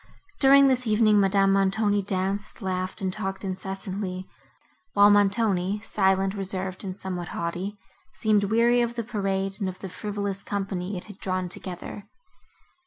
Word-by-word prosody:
During 275 0 +7
this 255 -2 +1
evening, 215 -1 +4
Madame 195 0 +3
Montoni 200 +1 +2
danced, 195 +3 -2
laughed 185 0 -3
and 190 -1 -1
talked 195 -2 -4
incessantly; 190 0 -4 0.7
while 205 0 +7
Montoni, 205 -1 +2
silent, 195 -2 +2
reserved 190 -1 -3
and 190 -1 -5
somewhat 180 -3 -5
haughty, 180 +5 -3 0.4
seemed 210 -2 +2
weary 235 +3 +3
of 235 0 -1
the 235 - -2
parade, 195 -3 -2
and 195 -3 -1
of 185 - -8
the 190 - -7
frivolous 200 0 -4
company 195 -1 -3
it 180 - -6
had 205 -2 -13
drawn 185 -1 -2
together. 185 +3 -7
195 Hz, 145 wpm, -26 LUFS, 190-210 Hz, 0.7 s, During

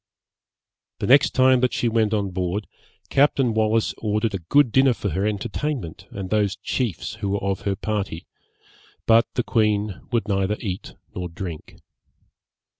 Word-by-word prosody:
The - - -3
next 140 +2 +5
time 130 0 +5
that 125 0 +1
she 120 - 0
went 110 -2 +2
on 100 -3 0
board, 90 +3 -2 0.4
Captain 135 -4 +3
Wallis 110 0 +1
ordered 105 0 0
a 95 - -2
good 125 - +3
dinner 130 +1 +4
for 105 - -3
her 95 +2 0
entertainment 110 - -3
and 95 -2 -6
those 105 -1 +1
chiefs 105 +1 -3
who 100 - -1
were 100 0 -1
of 100 0 -1
her 100 - 0
party; 100 -5 -3 0.8
but 115 0 +5
the 125 - +1
queen 105 -4 0
would 115 -2 0
neither 100 +1 0
eat 95 -4 -5 0.2
nor 90 -1 -4
drink. 85 -2 -7
105 Hz, 155 wpm, -23 LUFS, 95-115 Hz, 0.8 s, next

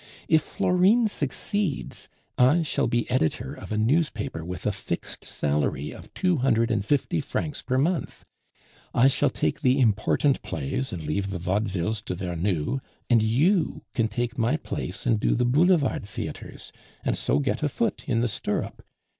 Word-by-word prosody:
If 160 -1 +5
Florine 190 +9 +3
succeeds, 175 +1 -2 0.3
I 140 +7 +4
shall 155 - 0
be 120 0 0
editor 80 - 0
of - - -10
a 105 - 0
newspaper 110 - 0
with 90 +1 -6
a - - +2
fixed - - -4
salary 75 0 -1
of - - -12
two 180 -3 +2
hundred 115 -3 +2
and 110 -4 +1
fifty 145 +7 +1
francs 145 +1 -3
per 130 0 -1
month; 165 +6 -1 0.7
I 125 +3 +6
shall 135 - +3
take - - -1
the 130 -1 +3
important 120 +4 +2
plays 80 - -3
and 85 -3 -5
leave 95 +7 -1
the 95 - -3
vaudevilles 95 +2 -1
to 90 - -3
Vernou, 90 - -1 0.3
and 115 -2 +6
you 150 - +2
can 115 -4 +1
take 120 +1 -3
my 120 +7 +2
place - - -5
and 115 -4 +3
do - - +2
the 125 - +2
Boulevard 145 - +3
theatres, 100 - -7 0.3
and - - +1
so - - +1
get 140 -3 0
a 150 - +1
foot 225 - -1
in 115 -4 +1
the 120 - +2
stirrup. 105 - -3
120 Hz, 165 wpm, -26 LUFS, 100-145 Hz, 0.7 s, I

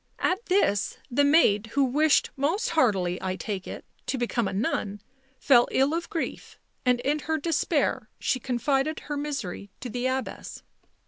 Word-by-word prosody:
At 375 +5 0
this 360 - +2
the 285 +4 +3
maid, 285 -8 +4
who 280 - +3
wished 290 +4 +3
most 340 - 0
heartily, 190 - +2
I 185 0 -2
take 195 -2 -5
it, - - -7 0.2
to 270 - -1
become 240 -3 0
a - - -4
nun, 205 -1 -1 0.4
fell 245 -4 +5
ill 270 +3 +2
of 340 +1 -3
grief, 330 - -4 0.3
and 250 -1 +3
in 295 +4 0
her 315 +2 -1
despair 325 +1 0
she 255 - 0
confided 270 +5 0
her 295 - -5
misery 275 -10 -4
to 245 - -6
the 245 +2 -1
Abbess. 260 0 -4
265 Hz, 165 wpm, -26 LUFS, 225-300 Hz, 0.4 s, fell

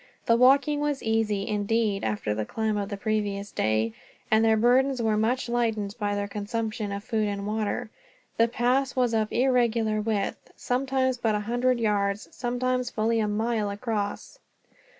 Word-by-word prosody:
The 230 - +4
walking 275 +4 +4
was 295 -1 -1
easy, 220 -3 0
indeed, 210 0 0
after 105 -1 -1
the 110 +1 -2
climb 220 - -2
of 200 -1 -2
the 200 - -4
previous 205 -1 -2
day; 110 +1 0 0.4
and 220 +1 +5
their 220 -1 +4
burdens 255 +3 +3
were 220 -2 +1
much 235 +4 0
lightened 225 -4 -1
by 205 -1 -1
their 205 0 -2
consumption 215 0 -3
of 200 0 -4
food 220 -3 0
and 200 -1 -3
water. 215 0 -2 0.5
The 230 - +4
pass 250 +3 +1
was 250 -3 +1
of 215 -1 0
irregular 235 -4 +2
width, 210 -2 -3
sometimes 260 0 0
but 225 -3 +1
a 210 - -1
hundred 245 +3 +1
yards, 205 -2 0
sometimes 250 0 -1
fully 225 0 0
a 215 - +1
mile 215 0 0
across. 205 - -4
220 Hz, 165 wpm, -26 LUFS, 205-245 Hz, 0.5 s, and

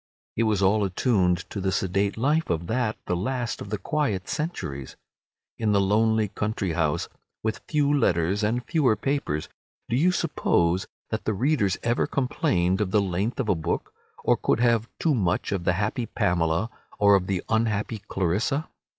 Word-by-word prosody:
It 115 - +2
was 105 -3 +1
all 100 +2 +3
attuned 95 -3 +1
to 100 - -4
the 95 0 0
sedate 100 +2 0
life 150 +7 +1
of 85 0 -1
that, 110 +2 -1
the 90 - 0
last 120 +5 -2
of 100 - -7
the 105 - -1
quiet 105 -4 -1
centuries. 70 - -4 0.6
In 110 -2 +1
the 100 - +4
lonely 110 +2 +2
country 105 -2 -2
house, 80 -2 0 0.4
with 110 0 -2
few 145 -2 +2
letters 90 - +2
and 120 +4 0
fewer 145 -10 +2
papers, 105 - -2 0.4
do 115 - +1
you 170 +8 +4
suppose 90 - +1 0.2
that 110 - -3
the 110 - 0
readers 120 -5 +1
ever 120 0 +1
complained 95 -8 +1
of 100 - 0
the 105 - +3
length 100 +5 -1
of 130 - 0
a 105 - +4
book, 80 -3 -3 0.3
or - - +4
could - - +1
have 115 -2 +2
too 160 - +2
much 95 -9 0
of 95 -3 -2
the 90 - +3
happy 110 +5 -1
Pamela 85 +4 0 0.3
or 100 0 +5
of 95 -2 +3
the 95 -2 -1
unhappy 110 -1 0
Clarissa? 105 - 0
105 Hz, 175 wpm, -25 LUFS, 95-120 Hz, 0.6 s, or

